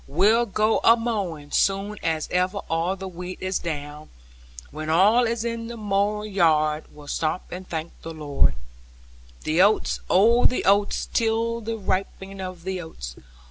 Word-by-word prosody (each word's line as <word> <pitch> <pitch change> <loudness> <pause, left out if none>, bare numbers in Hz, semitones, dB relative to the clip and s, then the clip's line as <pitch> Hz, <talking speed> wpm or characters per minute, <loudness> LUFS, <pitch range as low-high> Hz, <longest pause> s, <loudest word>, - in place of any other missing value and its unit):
We'll 210 +10 +3
go 215 +2 +2
amowing, 205 -11 +1
soon 200 +1 +1
as 160 -2 -1
ever 185 +2 0
all 165 +3 0
the 190 0 -7
wheat 180 0 -7
is 185 0 -1
down; 150 -2 -6 0.6
When 155 +1 -5
all 205 +9 +5
is 230 0 -2
in 230 -1 -3
the 235 0 -7
mow 210 0 0
yard, 160 -6 +2
we'll 145 -1 -14
stop, 155 +4 -2
and 185 +1 -8
thank 160 0 -4
the 165 - -7
Lord. 145 - +1
4 - - -13 0.8
The 160 +3 +2
oats, 205 +3 +3
oh 230 +6 +5
the 250 - +2
oats, 200 +1 +2
'tis 230 0 0
the 225 0 -2
ripening 195 0 -3
of 185 -2 -7
the 190 0 -3
oats! 65 - -8
190 Hz, 160 wpm, -24 LUFS, 160-215 Hz, 0.8 s, all